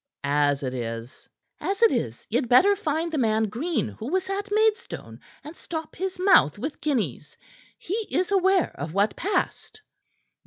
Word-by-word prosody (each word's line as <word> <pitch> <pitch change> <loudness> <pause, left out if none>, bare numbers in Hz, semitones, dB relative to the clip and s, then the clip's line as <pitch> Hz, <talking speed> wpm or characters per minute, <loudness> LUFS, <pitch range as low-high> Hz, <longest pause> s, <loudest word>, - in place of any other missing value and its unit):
As 145 0 +1
it 130 -1 -2
is 115 0 -6
" - - -52
"As 400 +4 -1
it 460 - +7
is, - - -3
ye'd 245 - -1
better 385 +12 +6
find 330 -3 -2
the 310 - -1
man 220 -2 +2
Green 255 - -1
who 225 - -8
was 375 +1 -1
at 405 +1 -3
Maidstone, 435 +2 0 0.2
and 305 +3 -9
stop 320 -2 -6
his 375 +1 -3
mouth 365 - +5
with 290 +8 -5
guineas. 200 - -2 0.4
He 420 +4 -4
is 360 +7 0
aware 380 -2 +3
of 155 +4 -5
what 200 +2 +2
passed." 405 +3 -2
315 Hz, 165 wpm, -25 LUFS, -, 0.4 s, it